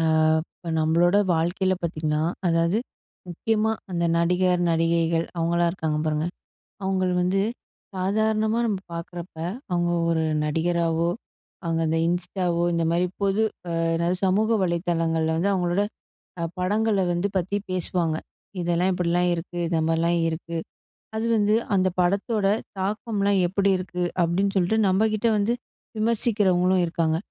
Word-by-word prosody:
அ - - +1 0.5
இப்ப 170 - -8
நம்மளோட 170 +4 +3 0.2
வாழ்க்கையில 180 +3 +1
பாத்தீங்கன்னா 155 -2 -1 0.2
அதாவது 170 +3 +2 0.5
முக்கியமா 220 +5 0 0.2
அந்த 170 -1 -1
நடிகர், 180 +1 +2
நடிகைகள் 165 0 +2
அவங்களாம் 170 +1 +1
இருக்காங்க 160 -4 -2
பாருங்க. 155 +1 0 0.6
அவுங்கள 190 -1 +1
வந்து 185 +2 +1 0.5
சாதாரணமா 215 +4 +1
நம்ம 205 -4 -1
பார்க்குறப்ப, 170 +1 -7 0.4
அவுங்க 175 -1 +1 0.2
ஒரு 160 -1 +1 0.2
நடிகராவோ, 165 +1 +1 0.5
அவுங்க 165 -1 0
இந்த 160 - +1
Instaவோ, 175 0 -1
இந்த 170 0 +1
மாரி 175 +2 +2 0.2
பொது 200 +2 +2 0.3
அ - - -3 0.2
என்னாது 170 +2 +1
சமூக 205 +4 +2
வலைதளங்கள்ள 165 -2 0
வந்து, 185 +5 +1
அவுங்களோட 180 +1 +1 0.6
அ - - 0 0.2
படங்கள 210 +4 +1 0.2
வந்து 175 +3 0
பத்தி 190 +3 -1
பேசுவாங்க. 175 -2 -1 0.5
இதெல்லாம் 175 +2 +1
இப்படிலாம் 175 0 +1
இருக்கு, 170 +1 -7
இந்த 165 -1 0
மாரிலாம் 165 +1 +2
இருக்கு, 165 +1 -5 0.6
அது 220 +1 -1
வந்து 210 0 +3 0.2
அந்த 185 -1 +3
படத்தோட 200 +3 +1 0.3
தாக்கம்லாம் 200 0 0
எப்படி 195 +2 +1
இருக்கு? 180 -1 -4 0.2
அப்டின்னு 195 +4 0
சொல்ட்டு 190 +4 +2
நம்ம 190 +4 +3
கிட்ட 215 +2 0
வந்து 210 +3 +1 0.5
விமர்சிக்கிறவங்களும் 200 -5 +2
இருக்காங்க. 165 -1 0
175 Hz, 125 wpm, -24 LUFS, 170-195 Hz, 0.6 s, நம்மளோட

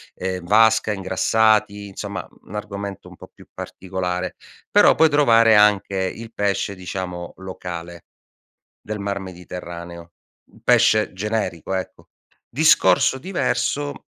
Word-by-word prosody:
ehm, 95 -1 -4
n - - -11
vasca, 110 +1 +4
ingrassati, 105 +2 +1
insomma 100 0 -6 0.2
n 100 - -10
argomento 100 -1 -6
un - - -14
po' - - -14
più - - -17
particolare. 90 -1 -4 0.4
Però - - +6
puoi 160 0 +5
trovare 115 -6 +5
anche 105 -2 +4
il 105 +5 -4
pesce, 100 -1 -1
diciamo, 90 -1 -6
locale, 85 -2 -8 0.8
del 105 0 -6
Mar 100 0 -3
Mediterraneo, 85 -2 -9 0.4
un - - -20
pesce 110 0 +3
generico, 100 -3 -3
ecco. 95 -1 -6 0.4
Discorso 130 - +4
diverso, 145 -3 -2
100 Hz, 120 wpm, -21 LUFS, 90-110 Hz, 0.8 s, Però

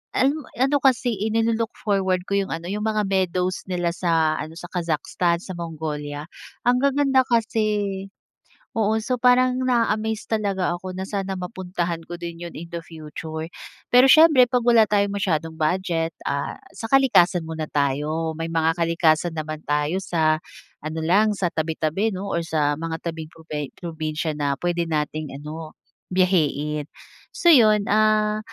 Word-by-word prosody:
ah, - - +3
ano 285 +2 0
ano 270 +4 +2
kasi 245 -5 +2
eh 210 - 0
ni-lo-look 225 0 0
forward 190 -3 0
ko 200 - +3
'yung 195 - -3
ano 170 +2 -6
'yung 210 +2 -2
mga 215 -1 +1
meadows 185 -1 0
nila 175 -2 -1
sa 165 -3 +1
ano, 160 +1 -6
sa 175 +1 -9
Kazakhstan, 170 +1 -1
sa - - -7
Mongolia, 155 -3 -5 0.3
ang 245 +1 +3
gaganda 275 -1 +3
kasi, 215 -4 0 0.7
oo. 215 0 +2
So 250 +3 -1
parang 250 +1 +4
na-a-amaze 220 -2 0
talaga 200 -4 0
ako 185 +1 -7
na 185 - -4
sana 195 -2 -3
mapuntahan 180 -2 -3
ko 175 - -7
din 170 -1 -6
'yun 170 - -10
in 170 +1 -8
the 170 - -4
future. 160 0 -7 0.4
Pero 250 +2 +7
siyempre 300 -3 +7
'pag 245 0 0
wala 230 -2 +5
tayong 205 -1 +1
masyadong 160 -4 -1
budget, 165 0 0
ah, 140 0 -2 0.2
sa 225 - -7
kalikasan 225 -10 +4
muna 160 -1 -4
tayo. 150 +3 -1
May 165 - -2
mga 165 +1 +1
kalikasan 165 0 +2
naman 155 -1 -5
tayo 150 +4 0
sa 160 -4 +1 0.5
ano 155 +1 -4
lang 205 +6 +3
sa 185 -3 -1
tabi-tabi 160 +6 -1
'no 195 +2 -5
or 170 -2 -1
sa 145 -2 0
mga 165 0 -4
tabing 165 -2 -5
probe 150 -3 -6
probinsya 160 -2 -4
na 140 -1 0
puwede 175 +3 -1
nating 155 -2 -3
ano, 155 +2 -8 0.4
biyahiin. 150 -5 +1 0.5
So 375 -5 +4
'yun, 215 -8 +6
ah, 215 0 +3
180 Hz, 160 wpm, -23 LUFS, 160-215 Hz, 0.7 s, Pero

